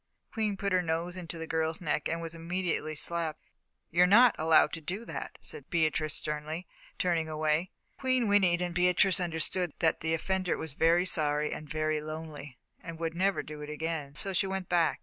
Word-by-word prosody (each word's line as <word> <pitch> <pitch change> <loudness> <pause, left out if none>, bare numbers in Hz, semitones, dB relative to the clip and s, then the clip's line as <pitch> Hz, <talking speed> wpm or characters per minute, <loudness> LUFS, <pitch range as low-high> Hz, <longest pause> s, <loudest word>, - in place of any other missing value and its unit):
Queen 215 -3 0
put 200 +1 -1
her 185 - +4
nose 170 +1 -2
into 175 -2 -6
the 165 - -5
girl's 160 0 -1
neck 150 -3 -1
and 165 - -1
was 165 0 -6
immediately 165 -2 -2
slapped. 165 0 -1 0.5
"You're 175 +2 +5
not 235 +4 +7
allowed 160 0 +5
to 165 - -3
do 190 +9 -4
that," - - -6
said 455 - -8
Beatrice, 155 -3 +1
sternly, 155 +3 -4 0.3
turning 165 -3 0
away. 155 +3 0 0.3
Queen 255 -3 +2
whinnied 185 -4 +3
and 175 -1 -3
Beatrice 180 +2 +3
understood 175 0 0
that 160 -2 +2
the 160 0 0
offender 185 +2 -1
was 160 -4 -5
very 170 +4 +3
sorry 150 -4 0
and 150 - -8
very 155 0 0
lonely, 155 -3 -7 0.2
and 170 -1 -7
would 165 0 -2
never 190 +3 +1
do 150 0 -8
it 150 - -7
again, 150 -2 -4
so 190 +6 -1
she 195 +2 +1
went 190 -1 -3
back. 170 -3 +2
165 Hz, 190 wpm, -30 LUFS, 155-180 Hz, 0.5 s, not